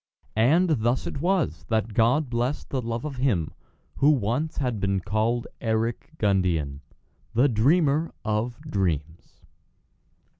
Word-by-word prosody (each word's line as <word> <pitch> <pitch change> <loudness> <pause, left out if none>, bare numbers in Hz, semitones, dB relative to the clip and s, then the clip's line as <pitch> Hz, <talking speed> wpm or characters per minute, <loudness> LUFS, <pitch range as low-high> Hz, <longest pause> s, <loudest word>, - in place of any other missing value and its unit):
And 150 +12 +4
thus 120 +3 0
it 140 - -5
was 170 - 0
that 110 -1 0
God 125 +8 +3
blessed 120 +4 -2
the 130 - -1
Love 115 +2 -4
of 140 -3 -5
him 110 - 0 0.4
who 145 - +4
once 135 +3 0
had 125 -6 -1
been 100 -1 0
called 110 +5 0 0.2
Eric 115 0 -1
Gundian, 90 -9 +1 0.6
the 125 +5 +5
Dreamer 145 +6 +2
of 110 +3 -1
Dreams. 85 - -3
115 Hz, 125 wpm, -25 LUFS, 100-140 Hz, 0.6 s, the